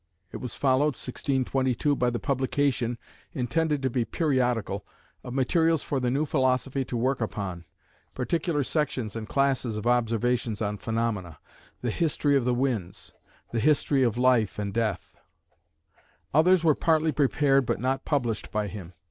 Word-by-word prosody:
It - - -5
was 125 - -6
followed 140 +1 +2
(1622) 130 +1 0
by 125 -2 +1
the 120 - -2
publication, 130 -2 0 0.4
intended 150 +3 0
to 130 - +2
be 120 -1 +1
periodical, 125 - 0 0.4
of 125 - -7
materials 160 +4 +2
for 140 - -1
the 125 -1 0
new 140 +5 +1
philosophy 135 -1 +1
to 120 - -3
work 130 +2 0
upon, 95 -6 -4 0.5
particular 150 +3 0
sections 130 -7 -2
and 110 -1 -6
classes 135 -5 +1
of 105 - -5
observations 120 -1 +1
on 105 -1 -2
phenomena 110 -7 -2 0.5
the 120 - 0
History 145 0 +1
of 135 -3 +2
the 125 -1 +2
Winds, 120 -9 -3 0.4
the 115 - 0
History 140 +1 +2
of 120 -3 +2
Life 125 -4 +3
and 100 -1 -3
Death. 110 -4 -2 1.2
Others 170 +4 +5
were 160 -2 +5
partly 160 +1 +2
prepared 140 -2 +2
but - - 0
not 130 +2 -1
published 120 -7 -1
by 105 -1 0
him. 95 -4 -9
130 Hz, 150 wpm, -27 LUFS, 115-140 Hz, 1.2 s, Others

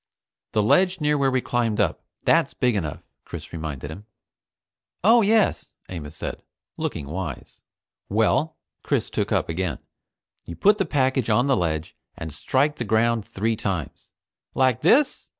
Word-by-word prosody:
"The 105 - +2
ledge 185 - +3
near 150 -1 +2
where 140 -2 +2
we 130 -1 +1
climbed 115 -3 0
up. 100 -5 +1 0.2
That's - - +3
big 125 -3 +1
enough," 80 -7 -3 0.2
Chris - - -9
reminded 75 -3 -5
him. 100 +6 -10 1.0
"Oh 230 +4 +6
yes," 215 +1 +2 0.2
Amos 80 -4 -7
said, - - -5 0.3
looking - - -3
wise. 85 +4 -6 0.5
"Well," 130 +9 +1 0.2
Chris - - -1
took - - -1
up - - +1
again, 85 -3 -2 0.7
"you 85 - -8
put 205 - +4
the 195 - +2
package 130 -4 +1
on 120 +4 +3
the 135 -1 +3
ledge 80 -5 -2 0.2
and 80 -2 -6
strike 140 - +1
the - - -2
ground 110 0 +1
three 110 +3 -1
times 95 -7 -4 0.2
" - - -69
"Like 130 -2 +2
this?" 265 - +3
115 Hz, 155 wpm, -24 LUFS, 90-140 Hz, 1.0 s, Oh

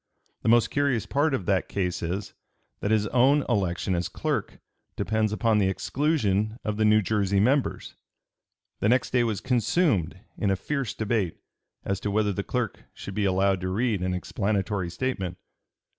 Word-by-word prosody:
The - - 0
most 120 0 +4
curious 140 -6 +1
part 145 +3 +1
of 100 - -4
the 95 0 +2
case 90 -3 -3
is, 90 +4 -3 0.5
that 100 - -2
his 110 -1 +3
own 135 +4 +4
election 95 -1 0
as 90 0 -1
clerk - - -2 0.4
depends 110 -1 0
upon 110 0 +2
the 95 - +3
exclusion 110 - 0
of 105 -1 -2
the 110 - +2
New 105 0 +5
Jersey 100 -1 +1
members." 130 +7 +1 0.9
The 105 - +2
next 125 +1 +2
day 125 -1 +3
was 110 -4 -1
consumed 125 - +1 0.2
in 100 - +1
a 95 - +3
fierce 135 +3 -3
debate 105 -5 -1 0.5
as 100 -1 -1
to 105 - -3
whether 105 0 +1
the 100 - -2
clerk 120 -3 -3
should 100 - -7
be 105 +1 0
allowed 95 0 +2
to 90 - -2
read 105 0 0
an 90 0 -1
explanatory 100 -1 -1
statement. 95 -5 -3
105 Hz, 170 wpm, -26 LUFS, 95-120 Hz, 0.9 s, New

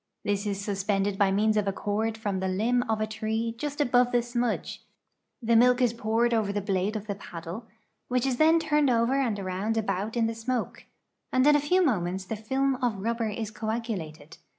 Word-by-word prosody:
This 205 0 -1
is 200 -1 -2
sus 200 -1 -3
pended 195 -1 0
by 200 -1 +4
means 215 +2 +2
of 210 -1 +1
a - - +2
cord 215 +3 -2
from 205 -3 -2
the 190 - -1
limb 225 +7 +1
of 220 -1 +1
a 215 - +1
tree 220 +1 -2
just 290 +2 -4
above 245 -3 +3
the 240 -1 +2
smudge, 240 -1 -2 0.6
the 230 +1 +3
milk 250 +2 +5
is 245 -3 +2
poured 230 +1 +1
over 215 -3 +1
the 205 - -1
blade 195 +1 -1
of 215 -1 -4
the 205 - -3
paddle, 180 +3 -8 0.4
which 250 0 0
is 260 -2 0
then 320 +3 +5
turned 300 -3 +2
over 240 +3 +2
and 230 -6 0
around 195 +3 -2
about 215 +1 -2
in 230 - +3
the 225 - -1
smoke,' 230 +1 -3 0.5
and 255 +1 +3
in 295 0 +6
a - - +4
few 360 +6 +2
moments 190 - -1
the 220 - -4
film 265 +5 0
of 245 -5 -1
rubber 230 0 -1
is 215 0 -4
coagulated. 200 -10 -5
220 Hz, 210 wpm, -27 LUFS, 200-245 Hz, 0.6 s, in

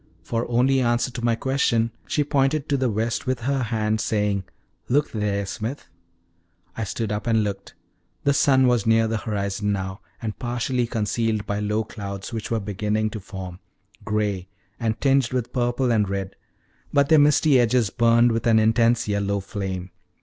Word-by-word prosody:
For 115 +1 -2
only 130 +3 +3
answer 120 +1 +1
to 120 -1 -6
my 120 -1 +2
question 115 -3 +1 0.2
she 150 - +1
pointed 145 +1 +1
to 145 - +2
the 130 -2 +1
west 115 +4 -2
with 130 -1 -1
her 135 +2 0
hand, 110 -2 0
saying: 105 -3 0 0.4
"Look 145 +4 +2
there, 100 -2 -1
Smith." 115 +7 -5 0.9
I 115 - -3
stood 110 +1 -3
up 105 +3 -3
and 110 -2 +3
looked. 100 -1 -5 0.5
The 140 - +3
sun 135 -2 +4
was 120 -4 +2
near 115 0 +4
the 115 0 -1
horizon 105 -1 -2
now, 95 0 -4 0.2
and 110 -3 -5
partially 120 0 -1
concealed 110 -1 -1
by 100 0 -2
low 105 +1 0
clouds, 100 0 -7
which 110 -2 -4
were 115 - 0
beginning 105 +2 -1
to 110 - -5
form 95 -2 -8 0.4
gray, 105 -4 -1 0.3
and 110 -2 -1
tinged 135 -2 +2
with 125 -2 -2
purple 120 0 +1
and 105 -4 +2
red; 95 -1 -3 0.6
but 140 -1 +3
their 160 -1 +7
misty 145 -1 +5
edges 120 -3 +2
burned 120 0 +4
with 115 +1 -1
an 115 -1 +5
intense 115 +1 +3
yellow 100 -1 0
flame. 95 -2 -5
115 Hz, 170 wpm, -23 LUFS, 105-125 Hz, 0.9 s, their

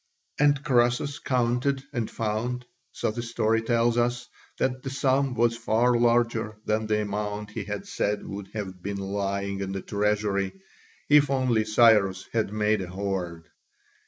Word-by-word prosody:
And 145 -1 +3
Croesus 125 +1 +2
counted, 125 +2 0
and 120 -4 -2
found, 115 +3 -2 0.3
so - - -2
the 120 +2 -4
story 115 -1 +1
tells 115 +1 +2
us, 120 +1 0 0.3
that 130 0 -1
the 135 - -5
sum 135 -1 +1
was 115 0 +2
far 115 +2 +2
larger 115 -2 +2
than 110 0 0
the 105 0 +1
amount 105 0 -4
he 105 -2 -5
had 105 0 -5
said 105 0 -2
would 100 0 -6
have 95 -4 -5
been 100 +2 -4
lying 100 0 -2
in 95 -1 -3
the 95 - -3
treasury 100 -2 0 0.5
if 145 -1 +5
only 130 -5 +2
Cyrus 105 -4 +4
had 110 -3 0
made 105 -1 +1
a 90 - -5
hoard. 90 -3 -3
110 Hz, 155 wpm, -26 LUFS, 100-120 Hz, 0.5 s, if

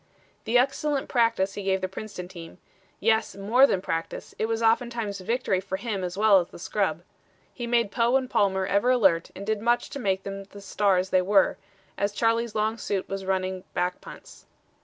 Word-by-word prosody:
The 235 +2 +3
excellent 275 +2 0
practice 230 -6 +2
he 205 - -5
gave 190 -1 0
the 185 - -2
Princeton 190 -1 -7
team 170 -2 -11 0.4
yes, 220 0 +1
more 225 +8 +4
than 185 -7 -1
practice: 165 -2 -4
it 220 - +1
was 225 0 -1
oftentimes 225 -3 0
victory 200 -1 0
for 190 0 -4
him 200 -3 -3
as 180 +1 -4
well 210 -2 +6
as 175 - -3
the - - -13
scrub. 175 -2 -2 0.5
He 240 -2 -5
made 235 -3 +1
Poe 235 +2 +2
and 260 -1 -3
Palmer 190 -4 +1
ever 200 +6 +2
alert 190 -9 +3
and 200 - -7
did 215 -1 -1
much 240 +1 +1
to 280 - -5
make 195 -5 0
them 195 0 -6
the 200 +1 -13
stars 190 -1 +1
they 185 - +4
were, 195 +1 +3 0.4
as 200 0 0
Charlie's 230 +1 0
long 220 +1 0
suit 195 -3 -2
was 195 0 -5
running 185 -1 -1
back 180 0 -1
punts. - - -13
200 Hz, 195 wpm, -26 LUFS, 190-230 Hz, 0.5 s, well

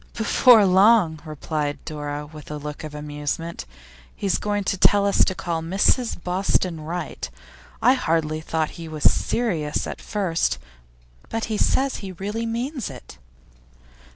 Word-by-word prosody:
'Before 225 -1 +6
long,' 190 -3 +5
replied 150 -1 -3
Dora, 145 -1 -4
with 150 -1 -12
a 150 - -4
look 150 +1 -7
of 155 -1 -7
amusement, 150 +3 -4 0.5
'he's 195 -3 0
going 205 -1 -1
to 195 - 0
take 195 - +5
us 200 0 +3
to 185 - +1
call 170 -2 -2
on 160 0 -6
Mrs 225 +6 +2
Boston 180 -2 0
Wright. 165 - -5 0.5
I 250 +3 +7
hardly 160 -9 0
thought 160 -1 -1
he 165 - -6
was 155 -1 -6
serious 165 -11 +1
at - - -6
first, 190 -6 0 0.7
but 225 0 -2
he - - 0
says 270 0 +2
he 190 -2 -7
really 210 +6 -3
means 245 - -3
it. 125 - -12
170 Hz, 150 wpm, -23 LUFS, 155-205 Hz, 0.7 s, I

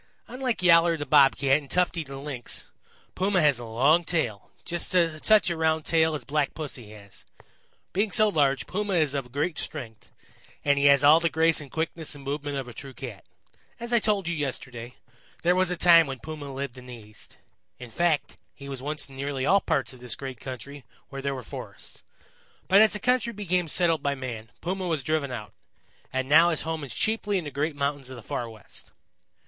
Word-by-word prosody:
Unlike 250 -6 -3
Yowler 170 -1 +5
the 145 - -4
Bob 140 -3 +5
Cat 135 +1 +3
and 140 -3 -14
Tufty 175 +1 +1
the 135 -2 -9
Lynx, 135 -4 -5 0.4
Puma 190 0 +1
has 145 -6 +3
a 120 - -7
long 135 +10 +3
tail 125 - -2 0.2
just 175 -1 -3
such 175 +3 +3
a - - -1
round 160 -1 +1
tail 160 -1 +2
as 150 - -5
Black 150 -1 -1
Pussy 130 -8 -6
has. 100 -2 -14 0.7
Being 205 +3 +1
so 215 +3 +5
large, 145 -8 +1
Puma 205 0 -2
is 155 -5 +2
of 135 -4 -4
great 150 +5 -2
strength, 115 -8 -7 0.5
and 145 -1 +3
he 140 - +2
has 140 -1 +6
all 150 +3 +8
the 170 0 +1
grace 160 0 +2
and 145 - -10
quickness 160 +1 -3
in 140 - -11
movement 145 +1 -3
of 135 -2 -4
a 120 - -9
true 135 0 -10
Cat. 115 -7 -8 0.5
As 235 +1 -5
I 235 - +5
told 205 -4 0
you 170 - 0
yesterday, 125 -4 -4 0.5
there 175 +1 +4
was 185 -1 +2
a 180 - -2
time 165 -2 +6
when 135 -1 -5
Puma 145 +1 -8
lived 135 -1 -5
in 125 - -13
the 125 - -8
East. 105 -2 -12 0.4
In 125 -2 -10
fact, 170 -1 0 0.2
he 140 - -11
was 135 -2 -6
once 150 +2 -4
in 135 - -14
nearly 135 -1 -3
all 195 +6 +4
parts 135 -2 -1
of 130 - -14
this 120 -3 -4
great 130 -3 -7
country 130 +3 -8 0.3
where 135 0 -6
there 140 0 -2
were 130 - -7
forests. 95 - -9 0.6
But 195 +2 +6
as 220 - +5
the 210 - -1
country 245 -1 +1
became 180 -4 -1
settled 165 -1 +2
by 140 -1 0
man, 120 -4 -6
Puma 185 +1 -3
was 160 -5 -1
driven 155 -2 -1
out, 105 -4 -7 0.6
and 130 0 -2
now 160 +4 +6
his 160 - -1
home 160 -1 -3
is 135 - -7
chiefly 215 -2 0
in 180 - -3
the 145 - -6
great 145 +2 -2
mountains 140 -2 -2
of 130 - -8
the 120 - -11
Far 120 +2 -4
West. 110 -3 -11
145 Hz, 210 wpm, -26 LUFS, 135-170 Hz, 0.7 s, all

